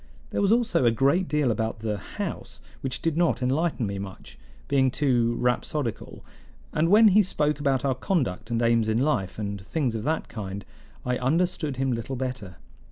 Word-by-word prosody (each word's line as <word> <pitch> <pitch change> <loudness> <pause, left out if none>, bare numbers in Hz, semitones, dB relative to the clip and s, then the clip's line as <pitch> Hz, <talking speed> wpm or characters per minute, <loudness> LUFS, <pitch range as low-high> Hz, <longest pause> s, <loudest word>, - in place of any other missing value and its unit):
There - - 0
was 200 0 +3
also 235 - +2
a 120 - +6
great 140 +11 +2
deal 150 -5 +1
about 110 0 -2
the 105 -2 -2
house, - - -6 0.2
which 135 +2 -4
did 165 -3 +1
not 170 -6 +2
enlighten 140 0 0
me 100 -1 -3
much, 95 -1 -9 0.3
being 135 -2 +3
too 120 -4 +1
rhapsodical, 125 +1 -2 0.5
and 160 +2 +2
when 215 +2 +7
he 205 +2 +6
spoke 150 -6 0
about 140 -2 +1
our 135 - +2
conduct 130 - -1
and 115 -1 0
aims 115 -1 +3
in 110 - +1
life, 120 -9 0
and 100 -2 -4
things 135 +1 -1
of 110 - -3
that 155 +7 -1
kind, 100 -3 -6 0.4
I 125 -1 0
understood 155 +1 0
him 135 0 0
little 120 +3 -3
better. 125 -8 -4
130 Hz, 180 wpm, -26 LUFS, 115-150 Hz, 0.5 s, when